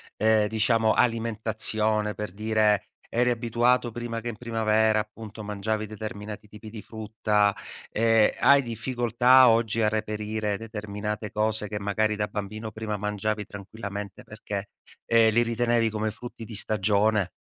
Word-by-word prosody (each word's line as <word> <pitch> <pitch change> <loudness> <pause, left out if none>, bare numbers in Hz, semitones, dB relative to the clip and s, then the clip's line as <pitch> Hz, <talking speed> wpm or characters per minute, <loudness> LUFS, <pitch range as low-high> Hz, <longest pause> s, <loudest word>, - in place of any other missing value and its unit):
ehm, 110 -1 +3
diciamo, 110 0 +2
alimentazione? 110 -2 0
Per 105 -3 -5
dire: 105 0 +1 0.2
eri 125 +1 +2
abituato 120 +1 +1
prima 115 0 -5
che 120 - -4
in 110 - -7
primavera, 110 -2 +2
appunto, 110 0 -10
mangiavi 105 +1 -2
determinati 105 0 -7
tipi 105 +1 -11
di 110 -1 -8
frutta, 105 -2 0 0.4
ehm, 115 -1 +4
hai 140 0 +6
difficoltà 120 +2 +3
oggi 115 0 +2
a 105 - +4
reperire 105 -1 -2
determinate 105 -1 -5
cose 110 -1 0
che, 105 0 -4
magari, 105 +1 0
da 105 0 -1
bambino 110 +2 -5
prima 110 -1 -4
mangiavi 105 +1 -2
tranquillamente 100 0 -7
perché, 105 -1 -6 0.4
ehm, 115 -1 +5
li 120 - +4
ritenevi 115 0 +1
come 110 0 -1
frutti 120 +1 -9
di 110 - -8
stagione? 105 -1 +2
110 Hz, 140 wpm, -26 LUFS, 105-115 Hz, 0.4 s, hai